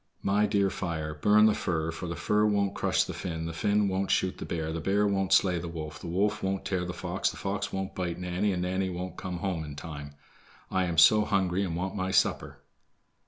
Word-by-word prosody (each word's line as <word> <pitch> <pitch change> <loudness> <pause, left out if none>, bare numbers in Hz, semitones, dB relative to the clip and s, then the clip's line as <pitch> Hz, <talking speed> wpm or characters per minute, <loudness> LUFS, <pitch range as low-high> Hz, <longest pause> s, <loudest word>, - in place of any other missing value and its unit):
"My 105 +2 +3
dear 100 -1 +2
fire, 80 -3 -3
burn 105 +7 +5
the 110 - +5
fir, 80 -5 -1
for 85 +2 -6
the 85 - -4
fir 105 +4 +1
won't 100 -1 +1
crush - - +1
the - - -6
Finn, 80 -3 -4
the 85 - -4
Finn 105 +3 +2
won't 95 0 -1
shoot 95 - +1
the - - -6
bear, 80 -1 -3
the 85 - -3
bear 100 +4 +2
won't 95 -2 0
slay 95 -2 +4
the 85 - -5
wolf, 80 -2 -6
the - - -8
wolf 100 +5 0
won't 95 0 -2
tear 90 -2 -1
the 90 - -3
fox, - - -2
the - - -8
fox - - -3
won't 95 0 -3
bite 90 -2 -3
Nanny, 90 +3 -1
and 90 -1 -1
Nanny 95 +1 -1
won't 90 +1 -5
come 90 -2 -5
home 90 -3 -2
in 75 -2 -8
time. 75 -2 -8 0.6
I 95 0 +2
am 85 -2 -3
so 105 +6 +7
hungry 95 -2 +1
and 85 -4 -2
want 95 +3 -3
my 95 -2 -1
supper." - - 0
95 Hz, 230 wpm, -28 LUFS, 85-100 Hz, 0.6 s, so